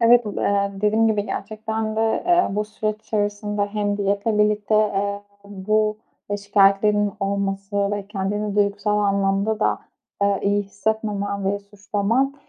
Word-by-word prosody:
Evet, 235 0 +6
bu 210 - -4
eee, 200 0 +1
dediğim 210 +3 +2
gibi, 210 -2 +1
gerçekten 220 +1 -3
de, - - +1 0.3
eee, 355 0 +4
bu 210 +2 -1
süreç 215 0 -4
içerisinde 205 -1 -1
hem 205 -1 -1
diyetle 205 +2 0
birlikte, 210 0 +2
eee, 205 -1 0 0.2
bu 215 +2 0 0.3
ve 205 - 0
şikâyetlerinin 205 0 +3
olması 200 0 -1
ve 205 -1 -3
kendini 205 +1 -2
duygusal 205 +1 +1
anlamda 200 +1 +1
da, - - +2 0.4
eee, 200 -1 +2
iyi 205 +1 +2
hissetmemen 200 -1 -2
ve 200 +1 0
suçlaman, 205 +6 -1
205 Hz, 140 wpm, -22 LUFS, 200-215 Hz, 0.4 s, Evet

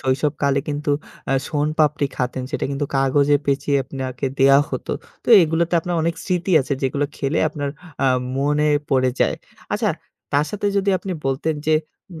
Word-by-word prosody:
শৈশবকালে 140 +1 +1
কিন্তু 145 0 -2 0.4
আ - - +3 0.2
শোন 150 0 0
পাপড়ি 150 -2 +3
খতেন 125 0 -2
সেটা - - -2
কিন্তু 140 +1 -2
কাগজে 140 +2 +3
পেচিয়ে 140 0 +1
আপনাকে 130 0 -4
দেয়া 135 +1 +6
হত। - - -4 0.4
তো - - -8
এগুলোতে 165 +2 +1
আপনার 175 +2 -3
অনেক 165 +1 0
স্মৃতি 180 +1 -1
আছে 135 - -3
যেগুলো 140 +2 0
খেলে 140 +2 -1
আপনার 145 -2 -4 0.3
আ - - +4 0.3
মনে 150 +2 +2 0.2
পড়ে 130 -1 +3
যায়। - - +3 0.4
আচ্ছা? - - +1 0.4
তার 145 +1 +3
সাথে 210 0 -2
যদি 200 0 +2
আপনি 190 - -5
বলতেন 145 +4 0
যে, 155 - +4 0.4
উম 160 - -9
145 Hz, 165 wpm, -21 LUFS, 135-155 Hz, 0.4 s, দেয়া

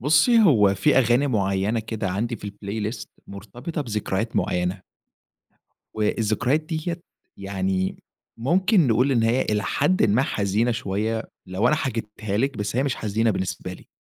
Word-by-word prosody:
بُصّي، 155 - +4
هو 105 - +5
في 95 +6 +3
أغاني 125 +2 +3
معيّنة 100 -2 0
كده 110 -2 -4
عندي 115 +5 -2
في 100 - -7
الplaylist 105 +2 -5 0.2
مرتبطة 120 - -7
بذكريات 110 -3 -2
معيّنة. 90 +2 -1 1.1
والذكريات 110 +6 +1
دِيَّة 160 +2 -4 0.4
يعني 95 -1 -2 0.4
ممكن 180 - +3
نقول 125 +4 +3
إن 120 -3 +2
هي 115 +3 +2
إلى 105 -1 0
حدٍ 145 - +1
ما 110 +5 +3
حزينة 105 0 0
شويّة 110 0 -2 0.2
لو 95 +6 +1
أنا 150 - +3
حكيتها 110 -7 -3
لِك، 135 +3 0
بس 105 +2 -3
هي 130 - +3
مش 135 -2 -1
حزينة 110 +1 0
بالنسبة 90 -2 -3
لي. 90 - -13
110 Hz, 145 wpm, -24 LUFS, 100-130 Hz, 1.1 s, هو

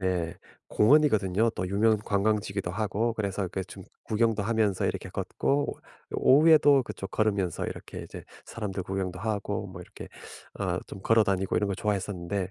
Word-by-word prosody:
네 90 -3 -1 0.3
공원이거든요. 110 -5 +3
또 95 - -4
유명 110 +3 +3
관광지기도 100 -2 -1
하고 110 +4 -1
그래서 100 -2 -2
이렇게 95 +1 -3
좀 95 0 -11 0.2
구경도 110 -1 +1
하면서 110 -2 +1
이렇게 - - -3
걷고 145 +1 -1 0.4
오후에도 145 -1 +6
그쪽 95 - -7
걸으면서 100 -6 0
이렇게 - - -7
이제 - - -9 0.2
사람들 100 -4 -5
구경도 95 -1 -3
하고 105 0 -2
뭐 90 -1 -9
이렇게 90 - -11 0.5
어 - - -1
좀 95 - -9
걸어 115 +1 +4
다니고 95 -1 0
이런 105 - +1
거 100 - -1
좋아했었는데 100 -2 -2
100 Hz, 375 characters per minute, -28 LUFS, 95-110 Hz, 0.5 s, 오후에도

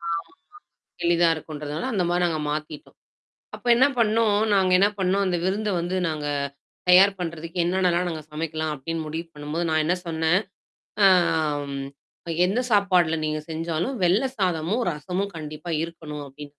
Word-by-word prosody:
ஆமா, 170 0 -2 0.9
எளிதா 170 0 +4
இருக்குன்றதுனால 155 - -5
அந்த 190 -4 +1
மாரி 175 0 +1
நாங்க 160 -3 -1
மாத்திட்டோம். 150 0 -6 0.6
அப்ப 245 - -10
என்ன 260 +3 +5
பண்ணோம்? 220 -2 +3 0.2
நாங்க 190 -2 +3
என்ன 200 - +6
பண்ணோம்? 195 +1 +2
அந்த 180 -2 0
விருந்த 205 +3 0
வந்து 175 +2 -2
நாங்க 155 -2 -4 0.6
தயார் 195 +2 +6
பண்றதுக்கு 165 0 -5
என்னென்னலாம் 180 0 +1
நாங்க 160 -3 -5
சமைக்கலாம் 155 0 -3
அப்படின்னு 160 +4 -4
முடிவு 160 +2 -4
பண்ணும்போது, 150 +3 -3
நான் 155 0 +2
என்ன 175 +4 +2
சொன்னேன்? 160 +2 +2 0.6
ஆ, - - +8 0.7
ம், 135 0 -4 0.6
என்ன 200 +6 0
சாப்பாடுல 185 -6 +3
நீங்க 155 0 -1
செஞ்சாலும், 165 +9 -2
வெள்ள 185 +8 +3
சாதமும், 185 +4 0
ரசமும் 180 +7 -3
கண்டிப்பா 155 +2 -6
இருக்கணும் 155 -3 -7
அப்படின்னு. 145 +2 -10
170 Hz, 145 wpm, -24 LUFS, 155-190 Hz, 0.9 s, ஆ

